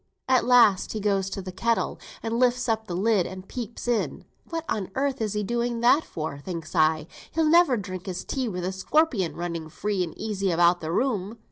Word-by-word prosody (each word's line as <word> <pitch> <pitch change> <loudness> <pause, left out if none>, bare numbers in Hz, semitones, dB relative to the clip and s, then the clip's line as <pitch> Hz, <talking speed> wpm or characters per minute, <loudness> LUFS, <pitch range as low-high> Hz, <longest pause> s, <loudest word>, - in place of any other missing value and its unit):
At 260 -1 +3
last 235 -6 +5
he 215 - -3
goes 195 -2 +1
to 195 0 -5
th' 185 -1 -8
kettle, 230 +4 0 0.2
and 230 +1 -1
lifts 250 0 +2
up 220 -1 0
the 175 - -3
lid, 200 -1 +2
and 190 0 -9
peeps 240 -1 -6
in. 240 -2 -1 0.2
What 330 -1 -3
on 195 -4 -2
earth 275 -1 0
is 215 -2 -1
he 210 0 -1
doing 235 +2 -1
that 250 +6 +5
for, 155 -3 -5
thinks 165 0 -6
I; 155 -1 +3 0.2
he'll 320 0 +1
never 320 -5 +5
drink 185 -3 -6
his 185 -1 -4
tea 265 -3 -2
with 180 -3 -4
a 185 - -1
scorpion 195 - +1
running 170 -2 -4
free 195 +3 -1
and 170 - -7
easy 200 -3 -2
about 175 +1 +4
the 160 0 -3
room. 215 -1 -1
210 Hz, 210 wpm, -26 LUFS, 180-240 Hz, 0.2 s, last